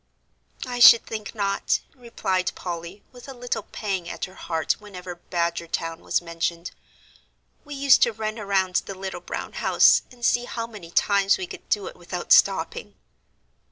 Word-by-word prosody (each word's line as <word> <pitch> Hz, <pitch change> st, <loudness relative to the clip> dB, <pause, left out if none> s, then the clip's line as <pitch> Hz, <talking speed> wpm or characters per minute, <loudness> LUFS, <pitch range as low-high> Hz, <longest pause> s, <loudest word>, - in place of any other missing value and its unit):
"I 245 Hz, -1 st, -4 dB
should 235 Hz, -1 st, +9 dB
think 215 Hz, 0 st, -6 dB
not," 200 Hz, -2 st, 0 dB
replied 230 Hz, -7 st, -2 dB
Polly, 175 Hz, +2 st, -7 dB
with 245 Hz, 0 st, -13 dB
a 270 Hz, -, -8 dB
little 245 Hz, -2 st, -3 dB
pang 195 Hz, -4 st, -4 dB
at -, -, -4 dB
her 185 Hz, -, -14 dB
heart 165 Hz, -4 st, -2 dB
whenever 185 Hz, -4 st, -9 dB, 0.2 s
Badgertown 170 Hz, -1 st, -2 dB
was -, -, -1 dB
mentioned. 170 Hz, +1 st, -3 dB, 0.9 s
"We 290 Hz, -1 st, -8 dB
used 275 Hz, 0 st, +5 dB
to 235 Hz, -, +4 dB
run 220 Hz, 0 st, -4 dB
around 190 Hz, -3 st, +1 dB
the 195 Hz, -, -6 dB
little 190 Hz, -2 st, -6 dB
brown -, -, -6 dB
house, -, -, +5 dB
and 240 Hz, -1 st, -6 dB
see 245 Hz, +1 st, +2 dB
how 230 Hz, -2 st, -4 dB
many 210 Hz, -7 st, -11 dB
times 200 Hz, +2 st, +3 dB
we 375 Hz, -, -4 dB
could -, -, -11 dB
do 410 Hz, -, +1 dB
it 475 Hz, +2 st, -8 dB
without -, -, -7 dB
stopping." 480 Hz, 0 st, +3 dB
200 Hz, 160 wpm, -24 LUFS, 175-240 Hz, 0.9 s, should